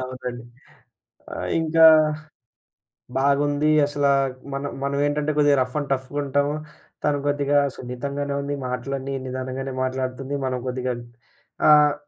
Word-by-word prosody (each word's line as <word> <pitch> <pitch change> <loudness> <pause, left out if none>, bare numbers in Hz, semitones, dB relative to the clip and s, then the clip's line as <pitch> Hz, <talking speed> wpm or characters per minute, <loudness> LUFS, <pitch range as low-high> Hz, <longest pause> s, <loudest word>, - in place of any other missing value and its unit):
అవునండి. 125 -2 -6 0.9
ఆహ్, - - -4
ఇంకా 160 0 +4 1.3
బాగుంది 145 +2 +2 0.2
అసల 145 0 -1 0.5
మనం 140 +1 -3
మనమేంటంటే 145 +2 0
కొద్దిగా 145 -1 +4
రఫ్ 130 +2 -5
అండ్ 145 - -4
టఫ్‌గుంటాము. 145 +2 -1 0.5
తను 145 -1 +2
కొద్దిగా 145 0 +2 0.2
సున్నితంగానే 140 +3 -4
ఉంది 145 0 -3
మాటలన్నీ 135 +2 -3
నిదానంగానే 130 +1 -4
మాట్లాడుతుంది 130 +1 -3
మనం 130 -1 -1
కొద్దిగా 125 0 -2 0.8
ఆహ్, 150 -1 +6
140 Hz, 105 wpm, -23 LUFS, 130-145 Hz, 1.3 s, ఆహ్